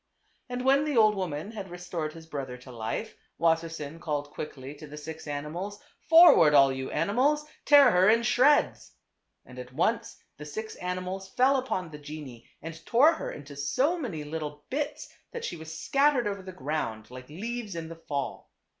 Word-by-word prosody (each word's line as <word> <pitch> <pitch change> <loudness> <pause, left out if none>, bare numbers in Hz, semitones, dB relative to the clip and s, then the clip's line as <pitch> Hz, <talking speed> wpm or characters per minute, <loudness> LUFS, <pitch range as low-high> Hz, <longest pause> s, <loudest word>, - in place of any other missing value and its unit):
And 250 +1 -4
when 275 +2 +5
the 295 -4 -1
old 215 -1 +6
woman 185 -1 -4
had 200 -4 -7
restored 175 -3 -5
his 165 -1 -12
brother 135 -5 -6
to 125 +1 -13
life, 110 -2 -4 0.2
Wassersein 165 -2 0
called 145 -3 -3
quickly 140 -2 -7
to 150 +1 -11
the 150 +1 -10
six 160 +1 -8
animals, 160 +8 -5
" - - -37
Forward, 325 - +8
all 135 -1 +7
yt>u 130 0 -4
animals; 255 - +1 0.2
tear 285 -3 +8
her 180 +2 +5
in 230 +1 +4
shreds! 275 +6 +3 0.3
" - - -52
And 125 0 -11
at 125 0 -9
once 210 - 0 0.2
the 150 - -9
six 220 +8 -6
animals 185 +1 -4
fell 260 +7 +3
upon 185 -10 -3
the 150 - -9
genie 145 -5 -9
and 165 0 -8
tore 275 - +5
her 320 - -5
into 145 -1 -10
so 255 - +1
many 230 - -4
little 150 -1 -6
bits 285 +2 -3 0.3
that 475 - -4
she - - -4
was 160 0 -8
scattered 275 -3 +2
over 200 -1 -3
the 185 0 -9
ground 135 -9 -4
like 125 +1 -10
leaves 215 +4 -5
in 165 -1 -5
the 165 - -8
fall. 145 -4 -5
165 Hz, 185 wpm, -28 LUFS, 150-225 Hz, 0.3 s, Forward